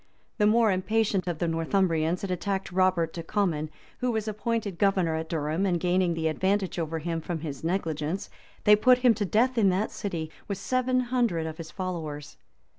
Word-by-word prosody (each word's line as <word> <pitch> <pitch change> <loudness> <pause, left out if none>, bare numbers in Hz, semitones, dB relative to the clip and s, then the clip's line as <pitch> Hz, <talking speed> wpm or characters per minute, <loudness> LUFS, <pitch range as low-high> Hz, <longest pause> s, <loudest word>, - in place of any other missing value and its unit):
The 210 - +5
more 225 0 +4
impatient 195 0 0
of 175 -3 -1
the 170 - -1
Northumbrians 165 0 +1
had 195 - -2
attacked 190 +2 -2
Robert 185 -3 +2
de 170 - -5
Comyn, 165 -6 -1 0.3
who 250 - 0
was 220 -2 -1
appointed 215 -3 -2
governor 190 -5 +2
of 160 0 -3
Durham; 160 +2 -1
and 175 -2 +1
gaining 180 0 +1
the 160 -1 0
advantage 190 +3 0
over 165 0 -2
him 165 +1 -3
from 165 -1 -4
his 145 -3 -6
negligence, 165 -1 -2 0.4
they 210 - +7
put 250 +4 +5
him 240 - +7
to 215 -2 -2
death 235 +5 +2
in 200 -3 +5
that 190 +4 0
city, 165 -6 -4 0.2
with 200 - -3
seven 255 +2 +1
hundred 240 -10 0
of 160 -1 -5
his 160 -1 -7
followers. 160 -6 -5
185 Hz, 190 wpm, -27 LUFS, 165-210 Hz, 0.4 s, they